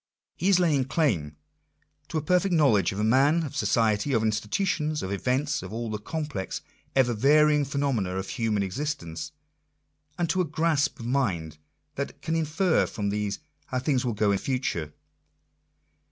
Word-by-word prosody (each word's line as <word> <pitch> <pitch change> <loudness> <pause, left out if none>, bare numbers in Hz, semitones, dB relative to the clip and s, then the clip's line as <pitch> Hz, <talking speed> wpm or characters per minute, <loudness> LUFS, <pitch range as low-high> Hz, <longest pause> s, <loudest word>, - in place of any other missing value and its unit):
He 185 - 0
is 190 -2 +5
laying 150 -7 +2
claim 95 - 0 0.7
to - - -3
a 155 - -1
per 180 +4 +4
fect 195 +1 -2
knowledge 135 - +4
of 95 - -6
man, 140 +8 +4
of 145 -2 -6
society, 115 -2 +1
of 115 -2 +2
institutions, 150 - 0
of 95 - -4
events, 130 +8 0
of - - -8
all 115 0 -4
the 105 - -3
complex, 150 -4 -4 0.3
ever 125 -3 +4
varying 150 +5 +4
phenomena 135 -9 -1
of 95 +1 -4
human 110 -5 0
existence; 90 - -4 0.9
and 175 - 0
to 185 - +1
a - - +1
grasp 155 -1 0
of 115 - -7
mhrf 100 - -1 0.4
that 140 - -4
can 160 -2 -1
infer 165 +2 +2
from 100 -2 -3
these 105 0 -2 0.3
how 130 - -2
things 130 0 +1
will 120 -3 -1
go 105 -1 +2
in 100 - +1
future. 105 - -2
130 Hz, 165 wpm, -27 LUFS, 105-150 Hz, 0.9 s, is